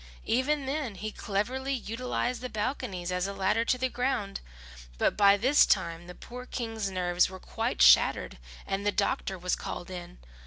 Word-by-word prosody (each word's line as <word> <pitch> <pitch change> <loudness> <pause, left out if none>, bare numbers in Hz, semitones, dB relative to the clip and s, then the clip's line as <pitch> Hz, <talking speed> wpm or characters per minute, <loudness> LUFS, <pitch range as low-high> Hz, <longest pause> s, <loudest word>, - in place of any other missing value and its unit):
Even 275 +4 +1
then, 270 -5 -2
he 215 +3 -5
cleverly 250 +8 -2
utilized 245 +1 -3
the 255 - -4
balconies 210 -6 -3
as 180 +1 0
a 200 - -4
ladder 200 +4 +1
to 255 - +1
the 260 +1 0
ground; 245 -6 -2 0.6
but - - +2
by 200 -1 +6
this 260 +7 +5
time 170 -3 0
the 180 - -9
poor 250 +1 -9
King's 225 -4 -3
nerves 180 -1 +1
were 190 0 -9
quite 65 - -1
shattered - - +5 0.3
and 195 +1 -2
the 205 - +2
doctor 200 -2 -1
was 180 0 -1
called 175 - -6
in. 175 - -8
205 Hz, 170 wpm, -29 LUFS, 185-250 Hz, 0.6 s, by